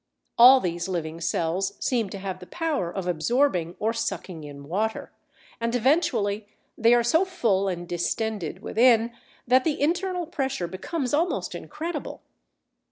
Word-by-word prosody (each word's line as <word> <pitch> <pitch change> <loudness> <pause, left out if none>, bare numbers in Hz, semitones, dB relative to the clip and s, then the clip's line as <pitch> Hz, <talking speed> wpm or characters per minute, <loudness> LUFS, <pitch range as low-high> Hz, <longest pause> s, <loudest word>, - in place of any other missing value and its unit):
All 255 +3 +9
these 175 -4 -2
living 165 -3 -4
cells 170 +3 -1
seem 235 -6 0
to 200 - -6
have 190 -1 -5
the 180 - -11
power 315 - -2
of 185 +1 -4
absorbing 180 - +1
or 220 +2 0
sucking 210 -7 -4
in 140 -1 -10
water, 215 +7 -2 0.5
and 230 +1 -1
eventually 220 - +1 0.3
they 230 +1 +5
are 240 - +3
so 320 +10 +3
full 230 - 0
and 175 -2 -3
distended 185 +1 -2
within, 235 0 +4 0.3
that 255 +1 +4
the 310 -3 -1
internal 355 +4 0
pressure 270 - -2
becomes 250 - -4
almost 330 +5 0
incredible. 335 +2 -6
220 Hz, 145 wpm, -25 LUFS, 180-265 Hz, 0.5 s, All